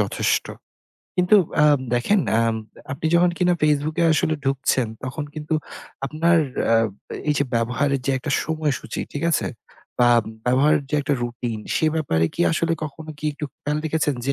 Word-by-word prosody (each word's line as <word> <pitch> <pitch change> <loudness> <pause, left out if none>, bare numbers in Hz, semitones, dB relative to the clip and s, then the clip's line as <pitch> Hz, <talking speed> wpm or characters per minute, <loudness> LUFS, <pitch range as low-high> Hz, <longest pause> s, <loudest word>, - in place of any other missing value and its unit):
যথেষ্ট। - - +1 0.7
কিন্তু 180 +4 +5 0.2
অ্যাম 150 -2 +5 0.2
দেখেন, 185 +12 +2 0.2
আম 115 -1 +2 0.4
আপনি 150 +3 -3
যখন 175 +1 +5
কিনা 180 -1 +3
Facebook 150 +1 +1
এ 170 - +4
আসলে 160 0 +1
ঢুকছেন 135 -2 +1 0.2
তখন 145 +4 -4
কিন্তু 155 +1 -3 0.5
আপনার 165 +4 +2 0.3
আ - - +6 0.5
এই 150 - +3
যে 140 - +2
ব্যবহারের 125 +4 +1
যে - - +2
একটা 140 - -5
সময়সূচী 155 -3 -2
ঠিক 145 +3 -3
আছে? - - +1 0.6
বা - - +6 0.4
ব্যবহারের 145 +4 +3
যে - - -1
একটা 145 0 0
routine 120 -2 -4
সে 160 - +2
ব্যাপারে 80 - +1
কি - - -4
আসলে 165 +1 +1
কখনো 155 +2 -8
কি 155 - -10
একটু 150 - -6 0.2
খেয়াল 150 +1 -1
রেখেছেন 155 -2 0
যে, 140 - +2
150 Hz, 165 wpm, -22 LUFS, 135-160 Hz, 0.7 s, আ